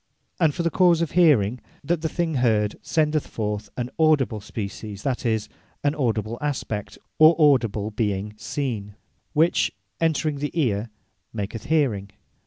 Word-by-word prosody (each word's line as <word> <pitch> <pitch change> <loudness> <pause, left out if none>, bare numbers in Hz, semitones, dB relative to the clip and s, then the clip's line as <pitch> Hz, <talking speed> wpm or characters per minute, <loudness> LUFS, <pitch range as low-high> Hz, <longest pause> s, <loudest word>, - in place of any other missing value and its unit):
And 160 -4 +3
for 170 - -1
the 170 - +1
cause 175 -2 +4
of 165 - -3
Hearing, 130 - +4 0.2
that 165 +2 0
the 160 - -1
thing 170 0 -1
heard, 110 -5 +2
sendeth 155 -1 0
forth 105 -1 -3
an 125 0 -3
Audible 145 -9 +3
Species, 100 0 -6
that 130 -2 -1
is, 110 -2 0 0.4
an 145 0 +2
Audible 115 -5 -1
Aspect, 130 -8 -3 0.2
or 155 +2 +8
Audible 115 -9 +3
Being 105 -1 -2
Seen; 105 -5 -4 0.4
which 160 +3 +3 0.3
entring 155 -2 +1
at - - -9
the 150 +3 -2
Eare, 115 -5 0 0.4
maketh 105 +1 -5
Hearing. 125 -11 +1
125 Hz, 150 wpm, -24 LUFS, 105-155 Hz, 0.4 s, or